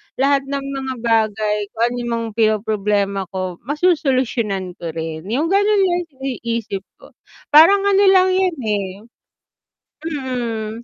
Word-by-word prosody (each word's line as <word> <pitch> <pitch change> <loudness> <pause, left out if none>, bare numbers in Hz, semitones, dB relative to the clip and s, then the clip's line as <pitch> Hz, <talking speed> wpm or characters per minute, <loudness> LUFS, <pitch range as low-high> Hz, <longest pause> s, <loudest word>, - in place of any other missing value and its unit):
lahat 275 0 +1
ng 280 0 -3
mga 270 -1 -4
bagay, 215 -2 +1 0.2
kung 230 - 0
anong 240 -1 -4
mga 230 0 -3
pinoproblema 205 -3 0
ko, 185 -2 -4
masosolusyunan 260 - 0
ko 165 -1 -6
rin. 160 +2 -5
Yung 295 - -1
ganun 405 0 +3
lang 350 0 0 0.2
iniisip 230 -6 -4
ko. - - -18 0.4
Parang 360 +7 +7
ano 400 0 +3
lang 375 -1 +5
yun, 370 -2 +1
eh 205 -3 -1 1.2
mm, 250 -8 -3
240 Hz, 125 wpm, -19 LUFS, 210-300 Hz, 1.2 s, Parang